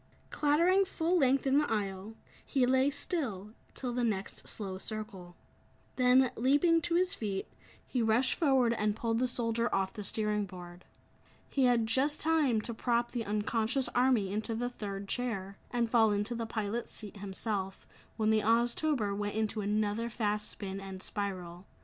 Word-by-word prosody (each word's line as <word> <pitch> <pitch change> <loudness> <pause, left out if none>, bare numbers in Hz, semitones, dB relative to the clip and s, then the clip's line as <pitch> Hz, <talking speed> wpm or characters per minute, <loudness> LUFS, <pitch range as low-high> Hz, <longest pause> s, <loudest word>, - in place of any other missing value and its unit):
Clattering 340 +6 +3
full 355 -1 0
length 270 -1 +3
in 270 +1 +4
the 295 - -1
aisle, 200 0 -3 0.3
he 265 -3 +1
lay 260 +2 +3
still, 260 - -3 0.2
till 250 -2 -3
the 245 0 0
next 205 -4 -2
slow 190 -3 -4
circle. 200 -5 -7 0.6
Then, 255 0 +4
leaping 290 +7 +3
to 335 +2 0
his 365 +1 +2
feet, 200 -3 -3 0.4
he 250 - -1
rushed 230 +3 +3
forward 265 -7 +3
and 210 -2 0
pulled 225 0 -1
the 255 - +2
soldier 235 -1 0
off 190 -1 0
the 210 - -6
steering 210 0 0
board. 180 -1 -11 0.7
He 270 -2 +2
had 240 -2 +3
just 270 +7 +1
time 305 -8 +2
to 235 - -3
prop 235 +1 0
the 235 -3 -3
unconscious 220 +5 0
army 245 -6 +2
into 220 +2 -2
the 245 +2 -2
third 200 -3 -6
chair, 200 -5 -3
and 240 -1 0
fall 225 -2 +4
into 205 +3 -1
the 230 -1 -3
pilot's 220 +1 -3
seat 210 -1 -7
himself, 195 0 -4 0.3
when 220 -1 +2
the 215 0 +3
Oztober 235 0 +1
went 205 0 -3
into 220 0 0
another 210 +2 0
fast 210 -2 -1
spin 195 -1 -6
and 190 0 -8
spiral. 185 -3 -4
225 Hz, 165 wpm, -31 LUFS, 205-255 Hz, 0.7 s, in